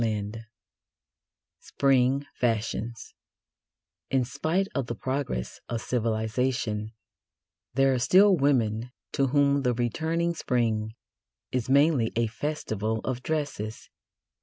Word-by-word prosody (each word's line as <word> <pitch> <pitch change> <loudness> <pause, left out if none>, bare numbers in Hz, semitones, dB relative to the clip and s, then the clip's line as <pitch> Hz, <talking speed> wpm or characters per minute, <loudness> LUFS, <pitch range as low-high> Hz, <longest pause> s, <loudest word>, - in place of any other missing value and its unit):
XVI 110 0 -3 1.1
SPRING 135 0 +2
FASHIONS 115 -1 -2 1.0
In 130 -2 +2
spite 165 +10 0
of 135 -3 -1
the 120 - -3
progress 130 - -3
of 120 - -1
civilisation, 110 -1 -1 0.8
there 135 0 +4
are 130 - 0
still 190 +10 +6
women 125 -6 +1 0.2
to 135 - +1
whom 140 +1 +3
the 125 -2 +1
returning 160 +8 0
Spring 110 -7 -1 0.6
is 125 -1 -2
mainly 140 -4 +4
a 115 0 +2
festival 110 -3 -2
of 130 -1 -3
dresses. 140 -8 -3
125 Hz, 105 wpm, -27 LUFS, 110-140 Hz, 1.1 s, still